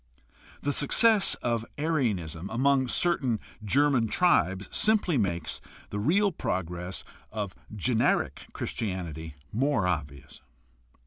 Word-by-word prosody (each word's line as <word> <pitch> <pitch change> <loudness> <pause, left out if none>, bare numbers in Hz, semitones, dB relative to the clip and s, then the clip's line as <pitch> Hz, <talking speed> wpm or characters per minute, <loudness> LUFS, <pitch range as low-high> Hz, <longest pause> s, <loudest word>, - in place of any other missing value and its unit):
The 145 - -1
success 205 - +4
of 115 -2 0
Arianism 105 - -1
among 130 +2 +2
certain 130 -7 +1 0.2
German 130 +1 +3
tribes 100 - +2
simply 210 -6 +4
makes 85 - -1 0.3
the 105 - -3
real 195 - +3
progress 90 - -3 0.3
of 105 -3 -4 0.2
generic 115 +3 +1
Christianity 80 -7 -4 0.2
more 125 -3 +1
obvious. 75 -5 -4
110 Hz, 100 wpm, -28 LUFS, 90-145 Hz, 0.3 s, success